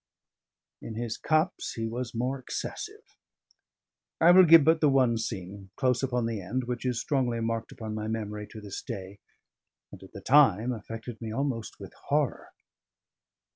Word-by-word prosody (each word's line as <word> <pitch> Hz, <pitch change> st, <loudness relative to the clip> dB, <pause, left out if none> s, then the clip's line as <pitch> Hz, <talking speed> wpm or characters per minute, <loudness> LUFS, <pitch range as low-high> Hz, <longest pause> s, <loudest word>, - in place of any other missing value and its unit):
In 110 Hz, -, -7 dB
his 115 Hz, 0 st, -3 dB
cups, 155 Hz, +4 st, 0 dB
he 115 Hz, -, -3 dB
was 120 Hz, +1 st, -4 dB
more 130 Hz, +4 st, -1 dB
excessive. 130 Hz, -, -7 dB, 1.0 s
I 170 Hz, +2 st, +7 dB
will 185 Hz, +1 st, +8 dB
give 165 Hz, -2 st, +8 dB
but 160 Hz, +2 st, +3 dB
the 150 Hz, -, +5 dB
one 130 Hz, -4 st, +3 dB
scene, 95 Hz, -3 st, -6 dB
close 125 Hz, -2 st, +1 dB
upon 125 Hz, -3 st, 0 dB
the 115 Hz, -3 st, -3 dB
end, 120 Hz, +8 st, -2 dB
which 125 Hz, +1 st, -3 dB
is 125 Hz, -2 st, 0 dB
strongly 125 Hz, -5 st, 0 dB
marked 115 Hz, 0 st, -2 dB
upon 110 Hz, -1 st, -6 dB
my 110 Hz, 0 st, -4 dB
memory 105 Hz, -1 st, -4 dB
to 110 Hz, -, -10 dB
this 100 Hz, -2 st, -7 dB
day, 100 Hz, -3 st, -7 dB, 0.7 s
and -, -, -12 dB
at 95 Hz, -, -13 dB
the 100 Hz, -, -7 dB
time 125 Hz, -3 st, +4 dB
affected 115 Hz, +1 st, -8 dB
me 110 Hz, -1 st, -5 dB
almost 130 Hz, -2 st, -3 dB
with -, -, -10 dB
horror. -, -, 0 dB
115 Hz, 165 wpm, -28 LUFS, 110-130 Hz, 1.0 s, will